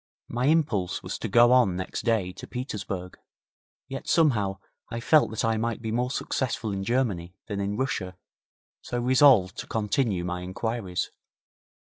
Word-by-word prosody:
My 125 +3 0
impulse 140 - +1
was - - -5
to - - -3
go 120 +4 +6
on 125 -8 +4
next 95 0 -4
day 110 -6 +1
to - - -10
Petersburg. 100 -7 -5 0.7
Yet 135 - -7
somehow 110 - +2 0.3
I 115 - -4
felt 145 +6 +4
that 110 0 -2
I 115 0 +1
might 115 +1 -1
be 110 -1 -4
more 125 +2 0
successful 130 -4 -2
in 95 -1 -3
Germany 95 -7 -1
than 100 -3 -3
in 100 +1 -2
Russia, 95 -9 -2 0.6
so 120 - -3
resolved 125 -6 +5
to - - -6
continue 105 -4 0
my 90 0 -3
inquiries. 95 0 -3
110 Hz, 155 wpm, -26 LUFS, 95-125 Hz, 0.7 s, go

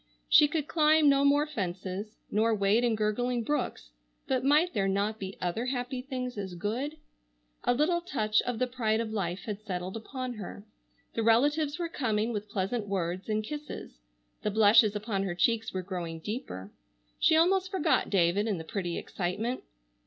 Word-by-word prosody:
She 295 - +7
could 300 -1 -2
climb 310 -1 +4
no 275 0 +4
more 285 +1 +4
fences 195 - -4
nor 220 +2 +3
wade 205 +3 +3
in 235 -2 +2
gurgling 235 +3 0
brooks, 220 - -2 0.3
but 255 -1 0
might 300 +6 +4
there 200 -4 +1
not 200 +3 0
be 190 0 -6
other 180 +8 -2
happy 250 0 -2
things 250 -3 -4
as 190 -3 -5
good? 245 - -3 0.7
A 245 - +3
little 340 +6 +2
touch 215 -12 +1
of 245 -2 -3
the 255 - +2
pride 230 -3 0
of 225 -1 -2
life 185 -4 -2
had 210 -1 -5
settled 185 -2 -4
upon 255 +3 -5
her. 205 -1 -8 0.5
The 230 - -1
relatives 290 +7 +3
were 345 -1 -2
coming 230 -7 -1
with 210 -1 -4
pleasant 205 +2 -2
words 185 0 -2
and 215 0 0
kisses. 295 +5 -7 0.4
The - - 0
blushes 210 0 +5
upon 210 -1 -2
her 190 -3 -2
cheeks 225 +3 +1
were 185 -1 -3
growing 175 -3 -4
deeper. 160 - -6 0.5
She 315 - +5
almost 370 +3 +3
forgot 380 -5 +1
David 195 +2 +2
in 205 -4 0
the 160 - -6
pretty 175 0 -3
excitement. 210 +8 -3
220 Hz, 175 wpm, -29 LUFS, 195-260 Hz, 0.7 s, She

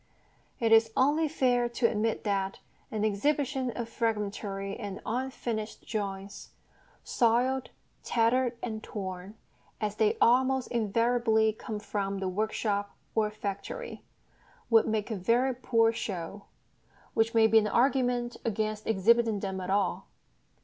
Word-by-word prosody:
It 230 -2 +1
is 225 0 +6
only 300 +4 +3
fair 245 -4 +1
to 235 0 -1
admit 225 0 +1
that 195 -2 -1 0.3
an 215 -1 -1
exhibition 265 +4 0
of 235 -1 -4
fragmentary 205 -3 -2
and 205 -4 -6
unfinished 235 -3 -3
drawings, 200 -2 -5 0.5
soiled, 250 +2 +1 0.3
tattered, 240 +1 +1
and 220 -2 -4
torn, 190 -1 -6 0.4
as 210 -1 -2
they 215 -1 +2
almost 260 +2 +3
invariably 230 0 +2
come 215 0 -6
from 200 -1 -3
the 190 -1 -2
workshop 205 +1 -1 0.2
or 215 -1 +2
factory, 210 - -6 0.7
would 225 -1 +6
make 220 0 -1
a - - -1
very 235 +7 +2
poor 230 -2 +2
show 200 -3 -5 0.7
which 225 +1 +1
may 225 -1 +6
be 220 0 +6
an 210 - 0
argument 245 0 +1
against 215 -1 -2
exhibiting 225 +1 +3
them 190 -1 -3
at 180 - -5
all. 195 -1 0
225 Hz, 130 wpm, -29 LUFS, 205-240 Hz, 0.7 s, is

